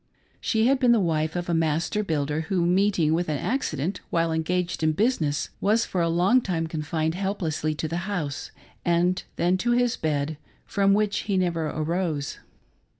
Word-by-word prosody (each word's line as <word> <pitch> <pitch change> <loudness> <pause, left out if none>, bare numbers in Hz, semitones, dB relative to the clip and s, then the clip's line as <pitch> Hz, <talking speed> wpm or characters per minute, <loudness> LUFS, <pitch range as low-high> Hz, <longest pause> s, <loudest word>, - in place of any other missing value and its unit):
She 220 -1 +1
had 270 +1 +3
been 250 -2 +5
the 230 - +4
wife 160 -3 0
of 175 0 -2
a 170 - 0
master 165 +5 +1
builder, 150 -3 -1
who 180 -3 +1
meeting 180 -3 +2
with 170 0 0
an 150 - 0
accident 190 - -2
while 165 -1 +1
engaged 170 +2 -1
in 155 0 +2
business, 160 - 0
was 220 +3 +3
for 180 - -1
a 170 - +2
long 185 +9 +4
time 170 -6 -1
confined 160 0 -2
helplessly 165 -5 -2
to 160 - -3
the 165 +2 -3
house, 155 -8 -3 0.3
and 175 +2 +2
then 180 +2 +2
to 240 +5 +1
his 245 0 +2
bed, 150 -1 -1 0.3
from 200 -1 +2
which 210 -1 +1
he 195 - +2
never 170 -3 0
arose. 155 -1 -2
170 Hz, 175 wpm, -25 LUFS, 155-195 Hz, 0.3 s, been